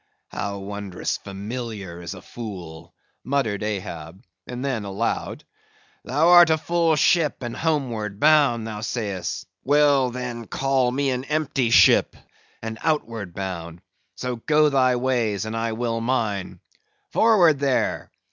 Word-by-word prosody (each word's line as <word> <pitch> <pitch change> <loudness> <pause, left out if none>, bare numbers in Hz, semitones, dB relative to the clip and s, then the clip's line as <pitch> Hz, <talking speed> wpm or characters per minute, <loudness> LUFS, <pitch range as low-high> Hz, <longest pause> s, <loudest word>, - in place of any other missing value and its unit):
"How 100 0 -4
wondrous 100 -1 -4
familiar 100 -3 -6
is 85 +3 -6
a 95 - -12
fool!" 85 -7 -9 0.3
muttered 130 -7 -1
Ahab; 95 -4 -5 0.2
then 125 -2 -3
aloud, 100 +3 -3 0.6
"Thou 150 +6 +2
art 175 -1 +8
a 160 - +3
full 165 0 +1
ship 160 -3 +2
and 120 -1 -4
homeward 120 -11 -2
bound, 145 -7 +4
thou 105 -2 -6
sayst; 105 -5 -3 0.2
well, 145 -2 +4
then, 120 -2 -6
call 135 -2 +1
me 135 +1 0
an 125 0 -2
empty 140 -4 0
ship, - - +5 0.5
and 110 0 -5
outward 115 - -2
bound. 85 -3 -6 0.3
So 125 +5 -4
go 150 +5 +3
thy 130 -3 +3
ways, 120 -6 0
and 110 +1 -4
I 115 0 -1
will 115 0 -2
mine. 110 -6 -2 0.5
Forward 180 -10 +4
there! 140 -2 0
120 Hz, 130 wpm, -23 LUFS, 100-140 Hz, 0.6 s, art